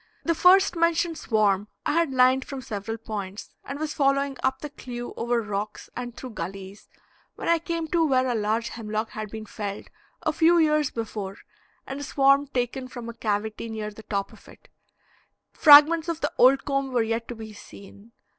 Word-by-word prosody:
The 335 - +1
first 370 +3 +5
mentioned 335 -1 +1
swarm 210 -5 +1 0.2
I - - +1
had 330 -1 +1
lined 260 0 +4
from 270 -1 -7
several 225 0 -5
points, 210 -3 -6
and 275 - -6
was 305 0 -3
following 275 0 +1
up 265 0 0
the 295 - -6
clew 245 -3 -7
over 235 0 0
rocks 210 0 -5
and 245 -1 -6
through 255 - -7
gulleys, 195 +1 -8 0.5
when - - -6
I 335 0 +4
came 330 0 -3
to 335 +1 +2
where 260 -2 +2
a 245 - 0
large 220 +1 -1
hemlock 215 -1 -4
had 215 -1 -6
been 220 +1 -7
felled 205 -1 -6 0.3
a - - 0
few 340 +1 +4
years 305 -3 +3
before 210 -4 -5 0.5
and 270 +1 -6
a - - -5
swarm 275 +1 +3
taken 255 0 -3
from 245 -2 -8
a - - -6
cavity 220 0 -3
near 215 -1 -5
the 210 - -12
top 200 -2 -3
of - - -18
it; - - -17 0.8
fragments 310 +2 +7
of 330 -1 -2
the 295 - -1
old 265 +2 +5
comb 275 -1 -1
were 245 -2 +2
yet 225 +1 -2
to 240 - -6
be 220 -1 -9
seen. 200 +2 -14
245 Hz, 190 wpm, -25 LUFS, 215-285 Hz, 0.8 s, fragments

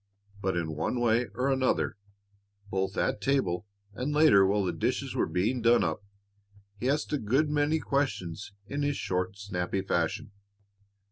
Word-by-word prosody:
But 95 -2 0
in 80 -2 -2
one 80 +10 -1
way 120 0 +2
or 130 +3 +1
another, 130 -1 +1 0.8
both 95 +1 -1
at 105 - 0
table 105 -9 0 0.3
and 125 +7 -3
later 150 -11 +6
while 100 +1 +2
the 90 - -1
dishes - - -1
were - - +1
being 115 +8 0
done 115 +1 +5
up, 80 +4 -2 0.8
he 125 - 0
asked 150 +2 0
a 150 - +1
good 135 +8 +1
many 150 +1 +2
questions 105 - -2
in 140 +7 -3
his 145 0 0
short, 95 +1 -2
snappy 95 -1 -2
fashion. 85 +1 -1
110 Hz, 155 wpm, -29 LUFS, 95-135 Hz, 0.8 s, later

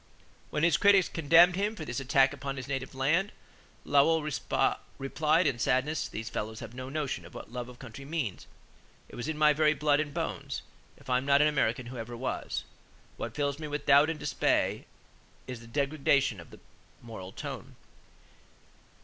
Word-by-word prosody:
When 150 - -2
his 170 -3 +4
critics 200 -2 +5
condemned 165 +3 +5
him 205 +3 -1
for - - -6
this 120 +2 -3
"attack 135 0 +3
upon 140 -1 -5
his 130 0 -6
native 135 -1 -4
land," 160 +10 +1 0.5
Lowell 150 +3 +4 0.7
replied 155 +5 +1
in 135 -5 +1
sadness: 135 +6 +1
"These 110 +1 -6
fellows 110 +1 -4
have 115 0 -8
no 130 +1 -7
notion 140 - -3
of 85 - -14
what - - -9
love 125 0 -5
of 125 - -12
country 130 +1 -10
means. 135 - -4 0.6
It - - -11
was 120 - -5
in 160 -1 -3
my 150 0 +5
very 155 +1 +3
blood 150 -1 +2
and 150 -1 -2
bones. - - -4 0.3
If - - -19
I 125 0 +2
am 130 - -7
not 140 +1 +5
an - - +5
American 130 -5 0
who 125 +1 -8
ever 120 +1 -6
was?... 130 +2 -3 0.5
What - - -5
fills 140 0 -1
me 155 - -5
with 145 0 -4
doubt 145 +3 +6
and 160 - -2
dismay - - 0 0.6
is 125 -2 -6
the 115 - -13
degradation 140 - +1
of 85 - -12
the - - -14 0.4
moral 105 -5 -8
tone. - - -7
140 Hz, 185 wpm, -29 LUFS, 125-155 Hz, 0.7 s, doubt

